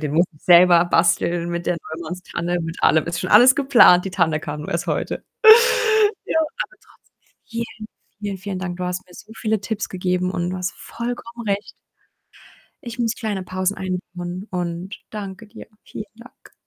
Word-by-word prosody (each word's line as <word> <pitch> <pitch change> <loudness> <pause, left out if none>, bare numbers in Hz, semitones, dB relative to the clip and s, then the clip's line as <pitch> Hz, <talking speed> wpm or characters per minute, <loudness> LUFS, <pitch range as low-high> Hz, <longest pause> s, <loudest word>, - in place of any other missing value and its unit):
Den 150 -2 -3
muss 170 +3 +4
ich 150 - -24
selber 175 -1 +6
basteln 170 0 +1
mit 170 0 -4
der 175 - +1 0.2
Neumanns-Tanne, 175 +1 -4
mit 165 0 -6
allem. 160 -1 +4
Ist 170 0 -3
schon 185 - -4
alles 245 +5 +8
geplant. 255 -10 +6
Die 195 - -4
Tanne 165 -4 +1
kam 150 -1 -6
nur - - -7
erst 170 +1 -2
heute. - - -3 1.0
Ja, - - +1
aber - - -4
trotzdem - - -27 0.3
vielen, 230 -1 -6 0.3
vielen, 205 -2 -4
vielen 190 0 -5
Dank. 180 -1 -5
Du 180 - -4
hast 180 0 -3
mir 180 - -18
so 215 - -13
viele 220 -3 -1
Tipps 205 +1 -4
gegeben 180 0 -1
und 175 -2 -2
du 185 - -4
hast 180 0 -3
vollkommen 235 -1 -7
recht. 200 +1 -2 1.1
Ich 235 0 -7
muss 230 -1 0
kleine 210 -6 -4
Pausen 185 +2 -2
einbauen 180 +1 -5
und 175 +1 -4
danke 200 0 -7
dir. 215 +2 -13 0.2
Vielen - - -7
Dank. 240 +3 -17
185 Hz, 175 wpm, -21 LUFS, 175-215 Hz, 1.1 s, alles